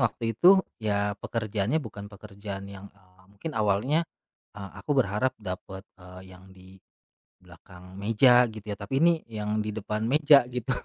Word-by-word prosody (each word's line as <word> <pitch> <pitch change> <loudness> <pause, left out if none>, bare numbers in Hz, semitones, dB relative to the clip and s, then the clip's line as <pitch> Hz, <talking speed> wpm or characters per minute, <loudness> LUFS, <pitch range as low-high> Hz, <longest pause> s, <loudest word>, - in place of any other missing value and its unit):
Waktu 115 -1 0
itu 190 - +6 0.2
ya 105 -1 0
pekerjaannya 110 +3 -2
bukan 105 -2 -9
pekerjaan 100 -1 -9
yang, 100 0 -10
eee, 95 -2 -26
mungkin 105 +11 -7
awalnya, 110 +10 +1 0.4
eee, 100 -2 -9
aku 150 - -2
berharap 105 +3 +1
dapet, 95 0 -7
eee, 90 0 -13
yang 95 +1 -17
di 95 0 -16 0.7
belakang 90 +2 -14
meja 120 +4 +5
gitu 110 -2 -10
ya, 100 - -6
tapi 135 +10 -1
ini 170 -1 +4
yang 105 -1 -3
di 105 0 -3
depan 110 +1 -3
meja 145 -2 +5
gitu 125 +1 -4
105 Hz, 155 wpm, -27 LUFS, 100-120 Hz, 0.7 s, itu